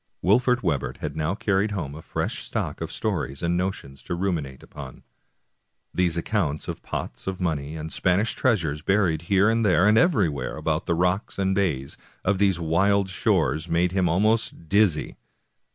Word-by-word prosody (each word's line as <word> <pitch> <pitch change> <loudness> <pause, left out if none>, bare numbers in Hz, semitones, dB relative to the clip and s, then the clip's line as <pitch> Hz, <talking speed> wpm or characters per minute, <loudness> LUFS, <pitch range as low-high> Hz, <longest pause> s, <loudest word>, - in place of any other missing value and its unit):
Wolfert 125 +6 +3
Webber 75 -8 -1
had 75 -1 -4
now 80 +4 -1
carried 100 0 +1
home 80 -8 -4
a 80 - -9
fresh - - -3
stock - - -3
of - - -4
stories 65 +4 -3
and 85 +1 +1
notions 90 -7 -3
to 85 - -4
ruminate 85 -8 -3
upon. - - -10 0.9
These 90 -2 +1
accounts 85 -5 -1
of - - -5
pots 60 - -6
of 95 -1 -3
money 80 -4 -2
and 80 0 -6
Spanish 95 +5 +1
treasures, 85 - 0
buried 95 -4 +2
here 100 +1 +4
and 115 +1 +2
there 95 -2 +4
and 110 +1 +5
everywhere 90 - +1
about 80 +1 -1
the 85 - +2
rocks 90 +4 0
and 95 -1 +1
bays 80 -9 -1 0.3
of 95 0 +2
these 95 -4 +3
wild 95 +4 +2
shores, 80 -3 0
made 85 +2 +2
him 95 -2 +1
almost 105 -1 +1
dizzy. 100 -4 +2
90 Hz, 170 wpm, -25 LUFS, 80-100 Hz, 0.9 s, and